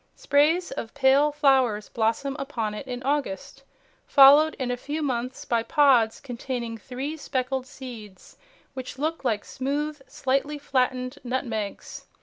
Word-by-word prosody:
Sprays 315 +5 +2
of 225 - -6
pale 280 +2 +4
flowers 265 -8 +2
blossom 230 +5 -1
upon 235 -6 -3
it 210 +6 -7
in 250 0 -5
August, 275 -4 -2 0.5
followed 290 +3 +7
in 255 -2 -3
a - - 0
few 295 +5 -4
months 255 -2 -3
by 235 -1 +1
pods 250 -4 +3
containing 245 -2 -5
three 260 +7 -5
speckled 260 -3 -3
seeds 235 -8 -11 0.4
which 260 -1 -7
look 315 +3 -2
like 215 -5 -1
smooth, 290 +3 -3
slightly 275 +3 -1
flattened 255 -1 -1
nutmegs. 235 -5 -4
260 Hz, 130 wpm, -25 LUFS, 240-285 Hz, 0.5 s, followed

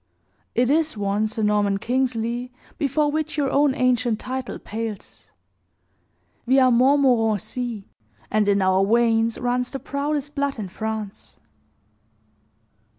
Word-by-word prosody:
"It 245 +2 +2
is 315 -4 +1
one, 205 +1 0
Sir 215 0 -3
Norman 205 -1 +2
Kingsley, 245 +1 -1 0.3
before 295 +1 +1
which 310 0 -3
your 275 -3 0
own 280 -1 +3
ancient 245 -3 +1
title 260 -1 -5
pales. 215 - -7 1.2
We 260 +2 +4
are 255 -1 +5
Montmorencis, 245 -3 +2 0.5
and 215 -1 +2
in 200 -1 +3
our 190 +1 +3
veins 230 +1 +2
runs 245 0 -1
the 270 - -5
proudest 290 +1 -3
blood 280 -2 -1
in 205 -4 -5
France." 220 0 -6
240 Hz, 120 wpm, -23 LUFS, 215-270 Hz, 1.2 s, are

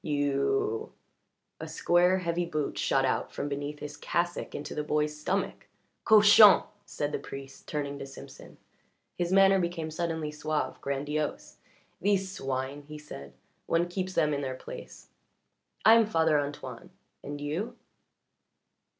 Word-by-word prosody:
You 410 - 0 0.3
" - - -50 0.3
A - - -6
square, 180 +2 +3
heavy 175 -1 -1
boot 155 -4 -2
shot 135 -1 +2
out 130 - -1
from 145 - -4
beneath 145 +1 -4
his 145 0 -8
cassock 175 0 -2
into 145 - -5
the 150 - -2
boy's 150 0 0
stomach. 185 +6 -2 0.4
"Cochon!" 210 -1 +8 0.2
said 145 0 -3
the - - -2
priest, 135 0 -10
turning 145 -2 -3
to 135 - -6
Simpson. 135 - -12 0.6
His 175 0 -2
manner 195 0 +6
became 170 -3 -2
suddenly 160 -2 -2
suave, 155 0 -3
grandiose. 145 +2 -3 0.4
"These 195 -1 +1
swine!" 135 -3 -3
he 150 0 -8
said. 70 - -10 0.3
"One 170 +1 +2
keeps 185 +1 -3
them 155 -4 +2
in 140 - -1
their 130 -2 -3
place. - - -10 0.8
I 220 - +9
am 230 -2 +5
Father 160 -6 +3
Antoine. 145 0 -6 0.3
And 145 +1 -6
you?" 180 +12 -3
155 Hz, 140 wpm, -29 LUFS, 145-185 Hz, 0.8 s, I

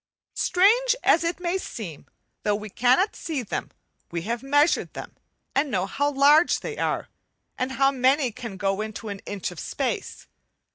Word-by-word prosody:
Strange 455 +7 +4
as 335 - +4
it 335 +2 -1
may 360 +1 -1
seem, 180 - -7 0.3
though 210 -1 +1
we 210 0 -7
cannot 255 - +3
see 300 -6 -3
them 210 - -4 0.4
we 170 -1 -4
have 235 +4 -2
measured 290 +4 +2
them - - -8 0.4
and 280 +2 +1
know 190 -6 0
how 285 +8 0
large 290 +4 +5
they 455 - -5
are, - - -1 0.5
and 260 +1 -2
how 270 0 +3
many 260 0 +2
can 225 -3 -8
go 195 0 0
into 215 0 -6
an 200 -1 -5
inch 200 -3 -3
of 175 - -9
space. - - -3
260 Hz, 170 wpm, -25 LUFS, 210-310 Hz, 0.5 s, large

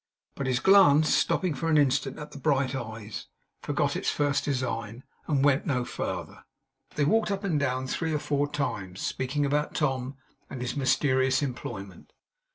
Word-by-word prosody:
But 135 - -4
his 125 -2 +1
glance, 155 -4 +6
stopping 180 -4 +1
for 165 +4 -2
an 155 - +4
instant 135 -1 +2
at 150 - -8
the 140 - -9
bright 140 -2 +1
eyes, 110 -4 -6 0.3
forgot - - 0
its - - -1
first 145 -1 +1
design, 125 -4 -3 0.2
and 140 -3 +2
went 145 0 +3
no 125 -4 0
farther. - - -5 0.5
They 145 - +2
walked 220 +6 +2
up 200 0 -2
and 170 -7 +1
down 130 -2 -1
three 160 +5 -2
or 155 - +1
four 145 0 -1
times, 100 -10 -3
speaking 140 +3 -1
about 150 +1 0
Tom 135 -3 -1 0.3
and 130 - -6
his 125 +2 -3
mysterious 130 -1 +2
employment. 120 -8 -6
140 Hz, 165 wpm, -27 LUFS, 130-150 Hz, 0.5 s, glance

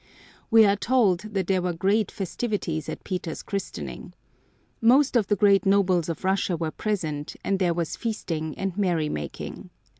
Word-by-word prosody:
We 225 -1 +7
are 200 0 +4
told 210 -5 +2
that 200 -2 -3
there 185 0 +1
were 180 -1 -1
great 200 +5 +1
festivities 190 -5 -3
at - - -6
Peter's 180 -4 -4
christening. 200 -1 -6 0.7
Most 260 +4 +4
of 225 -5 +3
the 205 - +2
great 200 -1 +4
nobles 190 -4 +2
of 165 - -4
Russia 190 -2 +1
were 160 -1 -2
present 155 -9 -3
and 195 -1 0
there 175 -3 +2
was 170 -2 -2
feasting 165 -9 -3
and 190 -2 -3
merrymaking. 160 - -2
190 Hz, 155 wpm, -25 LUFS, 170-205 Hz, 0.7 s, We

